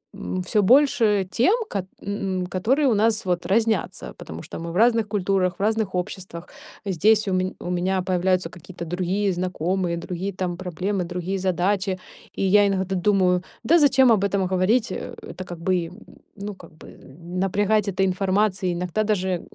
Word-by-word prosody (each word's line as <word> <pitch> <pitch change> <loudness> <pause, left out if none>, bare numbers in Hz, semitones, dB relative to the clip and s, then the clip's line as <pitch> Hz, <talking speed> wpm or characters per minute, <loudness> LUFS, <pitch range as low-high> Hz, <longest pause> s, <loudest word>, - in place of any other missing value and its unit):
м, 90 0 -4
всё 210 - +1
больше 225 -4 +4
тем, 345 - +3 0.2
кат 190 -2 -3 0.2
м, 195 -2 -2
которые 245 +11 +1
у 235 - +4
нас 215 +1 +1
вот 175 -1 -1
разнятся, 220 -1 0
потому 80 +1 -8
что - - -8
мы 170 0 -5
в - - -8
разных 230 -1 +4
культурах, 190 -3 0
в - - -8
разных 215 -3 0
обществах. 180 -2 -5 0.4
Здесь 205 +3 +3
у 190 - 0
ме 185 0 0
у 180 - -5
меня 185 +1 0
появляются 185 -1 +1
какие-то 175 0 -9
другие 185 +4 -1
знакомые, 180 0 -1
другие 180 +3 -4
там 180 -2 -3
проблемы, 185 +2 -2
другие 180 +2 -3
задачи. 185 +1 0 0.4
И - - -2
я 200 +2 +5
иногда 190 -1 -1
думаю: 180 -1 +2 0.2
"Да 335 +8 +5
зачем 265 -4 +5
об 210 -3 +3
этом 200 -1 +1
говорить?" 190 +5 +1
Э, - - -6
это 185 - -7
как 175 -2 -8
бы, 175 -1 0
м, 170 - -13 0.4
ну, 205 0 -6
как 170 -3 -15
бы, - - -13 0.4
напрягать 205 +2 +1
этой 195 0 +1
информацией. 190 0 +1
Иногда 180 +4 -1
даже 190 -4 0
190 Hz, 170 wpm, -23 LUFS, 180-205 Hz, 0.4 s, я